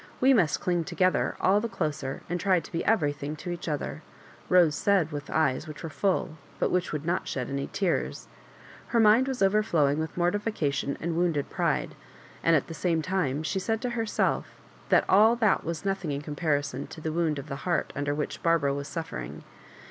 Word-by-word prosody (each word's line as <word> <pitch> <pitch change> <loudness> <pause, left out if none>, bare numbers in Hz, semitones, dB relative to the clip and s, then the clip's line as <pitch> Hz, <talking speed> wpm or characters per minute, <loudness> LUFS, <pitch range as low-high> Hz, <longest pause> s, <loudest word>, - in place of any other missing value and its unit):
"We 265 +1 +5
must 180 -11 +3
cling 175 -2 +1
together 185 +3 +1
all 200 +2 +3
the 230 - -3
closer, 150 -8 -3
and 175 +1 -2
try 185 -2 +3
to 165 - -12
be 165 - -2
everything 145 -7 0
to 175 +4 -6
each 175 0 -6
other," 150 +1 -3 0.5
Rose 175 -4 +5
said 180 -1 +2
with 145 0 -6
eyes 155 -1 +1
which 155 +2 -9
were 165 - -5
full, 180 -3 -1 0.2
but - - 0
which 180 0 0
would 150 0 -4
not 175 +2 -1
shed 130 -1 -3
any.iears. 140 +6 -2 0.6
Her 235 - +1
mind 225 +4 +5
was 260 -6 -1
overflowing 175 -8 +2
with 160 +2 -4
mortification 175 -7 0
and 165 0 -2
wounded 165 -5 0
pride, - - 0 0.5
and 165 - +5
at 145 - +2
the 165 - -8
same 165 -1 0
time 155 -6 -1
she 190 +4 -1
said 225 +3 -1
to 250 -1 -2
herself 225 -2 0 0.4
that - - +4
all 215 +4 +6
that 220 -4 +2
wias 165 +1 -4
nothing 195 -5 -1
in 140 0 -2
comparison 145 -3 -2
to - - -10
the 160 0 -3
wound 165 -3 0
of 140 +1 -6
the 140 -2 -5
heart 170 +5 -1
under 145 0 -1
which 150 - -4
Barbara 165 -5 +2
was 140 0 -4
suffering. 160 - -6
165 Hz, 195 wpm, -27 LUFS, 145-190 Hz, 0.6 s, all